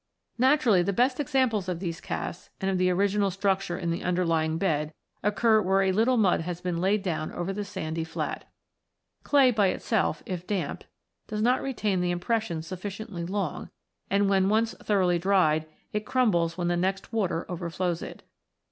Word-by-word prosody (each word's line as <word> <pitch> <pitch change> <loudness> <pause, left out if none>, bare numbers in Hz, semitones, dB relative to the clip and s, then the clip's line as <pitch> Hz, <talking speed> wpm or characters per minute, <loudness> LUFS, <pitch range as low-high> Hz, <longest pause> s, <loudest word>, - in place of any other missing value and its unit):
Naturally, 255 -7 +4
the 200 +3 0
best 255 +6 +2
examples 255 -9 +1
of 175 -2 -2
these 170 -3 -4
casts, 175 - -5
and 195 0 0
of 185 - 0
the 185 0 +3
original 200 +2 +2
structure 195 -1 0
in 170 -2 -2
the 165 - -2
underlying 165 -3 +1
bed, 155 -4 -1 0.3
occur 215 +2 +3
where 195 0 +2
a 190 - +2
little 230 +6 +3
mud 195 -7 +3
has 170 +1 -4
been 180 -1 -2
laid 195 +2 +2
down 160 -4 -2
over 175 +2 -3
the 205 +1 -3
sandy 165 -5 -4
flat. 165 0 -4 0.7
Clay 275 -3 +4
by 210 -4 +3
itself, 190 -4 0
if 180 -1 -5
damp, 200 -4 -3 0.4
does 210 -1 -2
not 250 +2 +3
retain 215 -8 -1
the 175 0 +1
im 175 - -2
pressions 180 -5 -1
sufficiently 190 +1 -6
long, 190 -4 -3 0.4
and, 200 +1 +2
when 195 -1 +3
once 225 +2 +2
thoroughly 185 -4 +2
dried, 165 -4 +2 0.3
it 210 0 -1
crumbles 175 -10 +1
when 175 -1 -1
the 175 - +1
next 190 +4 -2
water 185 -6 0
overflows 175 0 -2
it. - - -8
190 Hz, 175 wpm, -27 LUFS, 175-210 Hz, 0.7 s, Naturally